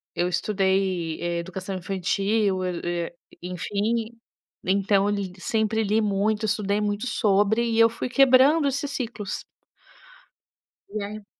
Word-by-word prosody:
eu 175 - +1
estudei 190 -3 0 0.2
educação 185 +2 -5
infantil, 195 +1 0
eu, 180 -1 -3
eh, 175 0 -3 0.3
enfim, 205 +6 -2 0.6
então 195 +1 +2
eu - - +2
li 195 -2 -3
sempre 220 +2 0
li 215 +2 +2
muito, 210 +1 0
estudei 210 -1 0
muito 210 +3 -1
sobre 210 +1 +2
e 230 -1 0
eu 230 0 +7
fui 230 +2 -5
quebrando 275 +4 +5
esses 280 +1 -2
ciclos. 230 -6 -4 1.5
E 205 0 -4
é 210 0 -7
205 Hz, 125 wpm, -25 LUFS, 190-225 Hz, 1.5 s, eu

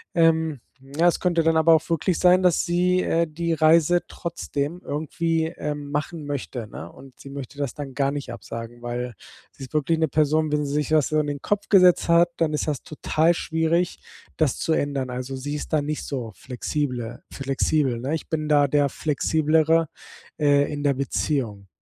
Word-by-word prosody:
Ähm, 160 -3 +3 0.2
ja, 145 +6 0
es 175 - +2
könnte 175 -2 +2
dann 165 0 +3
aber 160 +1 +6
auch 160 - +2
wirklich 165 +1 0
sein, 180 +1 +5
dass 180 -2 +3
sie, 180 +1 +2
äh, 170 -1 +1
die 165 +2 -2
Reise 165 +2 +4
trotzdem 165 -1 -4
irgendwie, 160 +2 -1
ähm, 150 -3 -5
machen 150 +2 -3
möchte, 125 -5 -4
ne? 85 -4 -9
Und 130 -1 -16
sie 140 - -11
möchte 140 0 -8
das 140 -3 -2
dann 140 -3 -7
gar 140 -1 +1
nicht 140 -4 -5
absagen, 115 +1 -8
weil 120 0 -4 0.4
sie - - -12
ist 130 - -17
wirklich 155 +2 +1
´ne 160 - +2
Person, 155 +1 +1
wenn 150 0 +1
sie 140 - -4
sich 150 0 -1
was 155 -3 +3
so 155 - +2
in 150 - 0
den 145 -1 -4
Kopf 205 -1 -2
gesetzt 180 -4 +5
hat, 170 +1 +5
dann 160 -2 +1
ist 150 - -1
das 145 -4 -2
total 155 +2 +1
schwierig, 165 +2 0 0.4
das 155 -6 +1
zu - - -1
ändern. 140 -3 -1
Also 125 +2 -5
sie 145 +3 -4
ist 150 - -6
da 150 - +3
nicht 150 +1 -3
so 125 -6 -4
flexible 125 -2 -4
flexibel, 135 -1 0
ne? 135 +5 -3
Ich 160 - -7
bin 155 -1 -2
da 145 -1 +4
der 145 0 +2
flexiblere, 160 +2 +1 0.5
äh, 145 -1 +3
in 145 -1 -4
der 140 -1 +3
Beziehung. 125 -6 -2
150 Hz, 195 wpm, -24 LUFS, 140-165 Hz, 0.5 s, aber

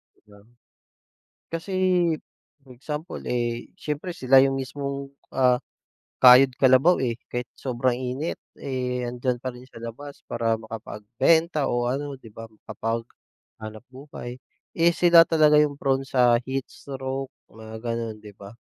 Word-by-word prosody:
'Di - - -33
ba? 100 - -16 1.1
Kasi, 165 +4 -4 1.0
example 150 +6 -6
eh, 120 -1 -2
siyempre 150 +4 -4
sila 130 -3 +5
yung 135 0 +2
mismong, 140 +1 -5 0.2
ah, 125 -1 +3 0.6
kayod-kalabaw, 130 +5 +7
eh. 120 -2 -1
Kahit 125 0 -4
sobrang 130 -1 0
init, 130 +5 -3 0.2
eh, 125 -2 -3
andiyan 120 +1 -2
pa 130 -1 -3
rin 125 +1 -13
sa 115 - -13
labas, 140 +5 -9
para 115 -1 0
makapagbenta 115 - 0
o 120 0 0
ano, 140 +2 -3
'di 120 -4 -15
ba? 115 +1 -9
Makapaghanap 110 0 -8
buhay. 130 -2 -9 0.4
Eh, 170 +1 +4
sila 170 -1 +7
talaga 155 -2 +4
yung 145 -1 +1
prone 135 -1 +1
sa 125 -3 +4
heatstroke, 135 0 -5 0.2
na 110 0 -10
gano'n, 115 -1 -3
'di 105 -1 -11
ba? 100 0 -11
130 Hz, 130 wpm, -25 LUFS, 120-140 Hz, 1.1 s, kayod-kalabaw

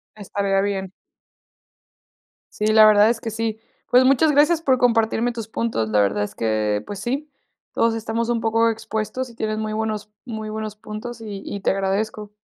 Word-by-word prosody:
Estaría 200 -1 -1
bien. 195 -2 -2 1.6
Sí, 210 - -2
la 215 0 +7
verdad 210 0 +6
es 230 -1 0
que 225 - -4
sí. 220 0 -3 0.3
Pues, 250 +1 +6
muchas 275 +4 +4
gracias 300 +3 +4
por 265 -5 +3
compartirme 230 -1 +2
tus 230 -3 -6
puntos, 220 - -2
la 105 -1 +2
verdad 100 +1 +1
es 105 - -6
que, 110 -2 0
pues 205 -2 -6
sí, 270 +8 -3 0.4
todos 230 0 +2
estamos 225 +1 -2
un 235 -1 0
poco 225 +1 +2
expuestos, 225 +3 -3
y 235 - -15
tienes 215 -1 -2
muy 215 0 -3
buenos 215 -1 -3 0.2
muy 220 -3 -5
buenos 215 -1 -5
puntos, 215 +2 -8
y 205 -3 -6
y 200 - -5
te 190 - +1
agradezco. 205 +2 -2
220 Hz, 180 wpm, -22 LUFS, 205-230 Hz, 1.6 s, la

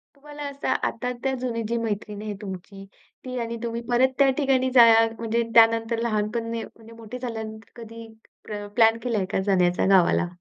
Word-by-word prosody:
तुम्हाला 295 +1 -10
असं 280 0 -6 0.2
आता-आता 250 +2 -3
जुनी 235 -2 -2
जी 235 - -2
मैत्रीण 210 -2 -4
आहे 215 -1 -5
तुमची, 195 0 -8 0.4
ती 255 0 -5
आणि 230 0 -4
तुम्ही 235 0 -3
परत 255 +2 +3
त्या 275 -1 +5
ठिकाणी 265 -3 +2
जाया 225 -2 +7
म्हणजे 230 +1 0
त्यानंतर 225 0 +4
लहानपण 230 0 -2
ने 230 -1 -3
म्हणजे 225 0 -14
मोठे 230 +2 -9
झाल्यानंतर, 220 -3 -7
कधी 230 0 -10 0.4
प्र 205 -1 -6
प्लॅन 225 -1 +5
केलाय 225 -6 -1
का - - +1
जाण्याचा 180 -2 +2
गावाला? 180 -1 +3
230 Hz, 165 wpm, -24 LUFS, 215-245 Hz, 0.4 s, जाया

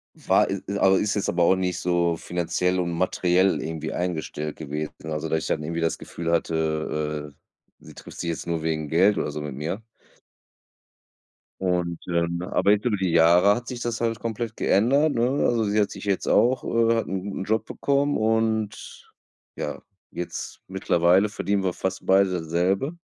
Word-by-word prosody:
War - - +2
i 100 - -2
i 100 +1 -2
aber 95 0 +5
ist 105 0 0
jetzt 100 - -1
aber 85 0 +2
auch 95 - +5
nicht 90 -1 -1
so 85 -1 +1
Finanziell 90 +2 -1
und 85 -1 -1
Materiell 90 +2 +2
irgendwie 80 -1 -4
eingestellt 80 -4 -3
gewesen, 75 0 -5 0.2
also 75 +1 -3
dass 80 - +1
ich - - -4
dann 75 - -1
irgendwie 85 +2 -3
das 80 -1 0
Gefühl 85 0 -4
hatte, 75 -2 -1
äh, - - -45
sie - - -12
trifft - - -12
sich 85 - -2
jetzt 85 - -4
nur 85 -2 -2
wegen 80 -1 -1
Geld 95 +6 +4
oder - - -1
so 75 - -5
mit 75 -2 -5
mir. 80 +9 -4 1.8
Und, 90 -2 0
ähm, 85 0 0
aber 100 +2 +2
jetzt 105 +2 +2
über 120 -4 +2
die 95 -3 -1
Jahre 85 +4 +6
hat 120 +3 -5
sich 125 -1 -6
das 120 -1 -2
halt 115 -1 0
komplett 115 0 -3
geändert, 140 +9 +3
ne? 115 +1 +2 0.2
Also 115 -2 +2
sie 105 +1 0
hat 100 - 0
sich - - -8
jetzt 100 -2 0
auch, 125 +2 +3
äh 115 0 +2
hat 115 - 0
'n 95 +1 -4
'n - - -2
Job 110 +2 0
bekommen 140 +1 0
und, 110 -1 -1 0.5
ja, - - -4 0.3
jetzt 90 - -6
mittlerweile 95 +1 +3
verdienen 100 -1 -1
wir 90 - 0
fast 95 +1 -4
beide 95 0 +4
dasselbe. 90 - -1
90 Hz, 185 wpm, -25 LUFS, 85-105 Hz, 1.8 s, Jahre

